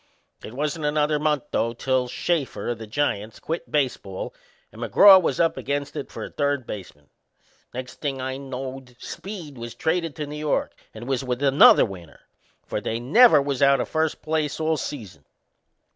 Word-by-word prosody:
It 110 Hz, -, -9 dB
wasn't 150 Hz, +2 st, -2 dB
another 150 Hz, 0 st, +1 dB
month, 150 Hz, -2 st, +1 dB
though, 115 Hz, 0 st, 0 dB
till 130 Hz, +1 st, 0 dB
Shafer, 150 Hz, +1 st, -2 dB
o' -, -, +1 dB
the 110 Hz, -1 st, -9 dB
Giants, 110 Hz, -4 st, -2 dB
quit 165 Hz, +2 st, -5 dB
baseball 125 Hz, -10 st, -2 dB, 0.4 s
and 110 Hz, -, -12 dB
McGraw 190 Hz, -, +8 dB
was 140 Hz, -6 st, -1 dB
up 165 Hz, -1 st, +2 dB
against 145 Hz, +1 st, -3 dB
it 145 Hz, -, -5 dB
for -, -, -6 dB
a -, -, -7 dB
third 145 Hz, -3 st, -1 dB
baseman. 75 Hz, -10 st, -9 dB, 0.6 s
Next 125 Hz, 0 st, -8 dB
thing 140 Hz, -3 st, -2 dB
I 130 Hz, 0 st, -3 dB
knowed 130 Hz, -1 st, -7 dB
Speed 170 Hz, -, -8 dB
was 120 Hz, 0 st, -7 dB
traded 165 Hz, +3 st, -1 dB
to 150 Hz, -, -4 dB
New 150 Hz, +1 st, -7 dB
York 150 Hz, -1 st, -1 dB, 0.2 s
and 110 Hz, +2 st, -10 dB
was 135 Hz, -1 st, -1 dB
with 125 Hz, +1 st, -3 dB
another 140 Hz, 0 st, +7 dB
winner 90 Hz, -5 st, -11 dB, 0.4 s
for -, -, -3 dB
they 115 Hz, -, -2 dB
never 160 Hz, -, +6 dB
was 140 Hz, -2 st, -2 dB
out 140 Hz, 0 st, +5 dB
o' -, -, 0 dB
first 160 Hz, 0 st, -1 dB
place 155 Hz, -2 st, -1 dB
all 160 Hz, 0 st, +1 dB
season. 105 Hz, -, -7 dB
140 Hz, 175 wpm, -24 LUFS, 120-150 Hz, 0.6 s, McGraw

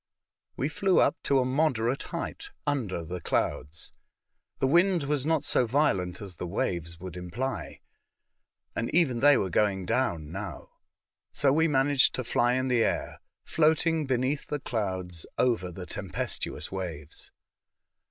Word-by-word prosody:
We 135 Hz, -, 0 dB
flew 185 Hz, +4 st, +2 dB
up -, -, +4 dB
to 140 Hz, -, +3 dB
a 130 Hz, -, +3 dB
moderate 130 Hz, -2 st, +1 dB
heiglit, 410 Hz, -, -5 dB, 0.2 s
under 115 Hz, -, -1 dB
the 90 Hz, +2 st, -5 dB
clouds. 75 Hz, 0 st, -2 dB, 0.6 s
The -, -, +1 dB
wind 175 Hz, +4 st, +4 dB
was 145 Hz, 0 st, 0 dB
not 160 Hz, -2 st, +2 dB
so 125 Hz, -, +2 dB
violent 105 Hz, -, +1 dB
as 95 Hz, -4 st, -8 dB
the 90 Hz, -, -4 dB
waves 85 Hz, -2 st, -2 dB
would 90 Hz, -1 st, -7 dB
imply, 90 Hz, +10 st, -4 dB, 0.9 s
and 115 Hz, -, -1 dB
even 140 Hz, -9 st, +3 dB
they 145 Hz, +1 st, +6 dB
were 95 Hz, -, -1 dB
going 95 Hz, -1 st, +1 dB
down 85 Hz, -, 0 dB
now. 100 Hz, +3 st, -6 dB, 0.6 s
So 135 Hz, -2 st, +2 dB
we 160 Hz, +2 st, +4 dB
managed 140 Hz, -2 st, +3 dB
to 130 Hz, -, -2 dB
fly 120 Hz, +1 st, +2 dB
in 130 Hz, +1 st, 0 dB
the 125 Hz, -3 st, +3 dB
air, -, -, -2 dB, 0.2 s
floating 160 Hz, 0 st, +2 dB
beneath 130 Hz, +3 st, 0 dB
the 150 Hz, -, -2 dB
clouds 95 Hz, -, -3 dB
over 115 Hz, -8 st, +1 dB
the 90 Hz, +1 st, -7 dB
tempestuous 80 Hz, -, -3 dB
waves. 85 Hz, -6 st, -6 dB
125 Hz, 145 wpm, -28 LUFS, 90-145 Hz, 0.9 s, they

